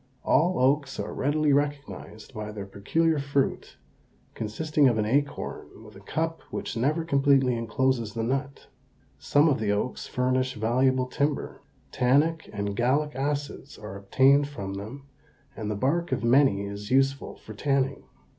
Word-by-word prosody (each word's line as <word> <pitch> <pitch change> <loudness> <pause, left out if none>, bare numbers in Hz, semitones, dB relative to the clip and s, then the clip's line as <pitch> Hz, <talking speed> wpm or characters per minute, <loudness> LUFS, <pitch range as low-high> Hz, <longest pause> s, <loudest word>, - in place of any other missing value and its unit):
All 180 +4 +3
oaks 135 +1 +1
are - - -4
readily 145 +1 +1
recognized 140 -5 -3
by 105 -2 -5
their 105 -2 -6
peculiar 155 +12 0
fruit, 140 -1 -1 0.6
consisting 145 +7 +1
of 120 -3 +2
an 105 - +1
acorn 140 +5 -2
with - - -14
a - - -11
cup 165 +1 -3
which - - -5
never 150 +8 0
completely 140 -4 +3
encloses 115 0 -1
the 115 - -1
nut. 135 +3 -3 0.5
Some 145 +2 +3
of 145 -6 +2
the 105 -2 0
oaks 105 +5 -2
furnish 130 +1 0
valuable 125 +4 +2
timber. 140 +3 -2 0.3
Tannic 145 +6 +2
and 100 -1 -3
gallic 140 +6 +1
acids 145 +1 -3
are 105 -2 -8
obtained 135 +8 +3
from 100 -9 -6
them 110 +8 -8 0.5
and 110 -2 -4
the 105 - -1
bark 160 +11 0
of - - -1
many 120 -4 +4
is 100 +1 -7
useful 135 +1 +1
for 110 - -11
tanning. 135 +3 -1
135 Hz, 150 wpm, -26 LUFS, 110-145 Hz, 0.6 s, many